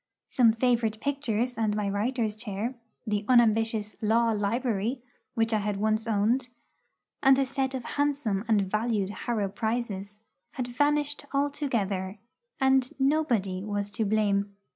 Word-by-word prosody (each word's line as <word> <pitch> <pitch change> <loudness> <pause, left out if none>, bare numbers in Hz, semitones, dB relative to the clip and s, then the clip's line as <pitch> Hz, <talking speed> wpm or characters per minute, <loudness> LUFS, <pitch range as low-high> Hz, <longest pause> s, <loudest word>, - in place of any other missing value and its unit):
Some 235 -3 +4
favourite 230 -2 +1
pictures 250 -4 -1
and 215 -2 +1
my 210 -1 -1
writer's 215 +2 -1
chair 215 +2 -4 0.3
the 210 -2 -1
unambitious 225 -3 +3
'Law 230 +2 +3
library' 225 +2 -1 0.4
which 225 -1 +1
I 215 - +3
had 205 -1 -2
once 215 +2 0
owned, 230 +4 +1 0.7
and 270 -1 +6
a 270 - +2
set 265 0 -2
of 255 - -4
handsome 280 -9 0
and 215 -3 +3
valued 215 0 -1
Harrow 210 0 -2
prizes, 210 -1 -3 0.4
had 255 -2 -3
vanished 290 +3 0
altogether, 230 -10 -1 0.4
and 265 -1 +3
'nobody' 245 -10 +1
was 205 -1 -3
to 215 +2 -1
blame. 200 -1 +1
225 Hz, 135 wpm, -28 LUFS, 205-255 Hz, 0.7 s, and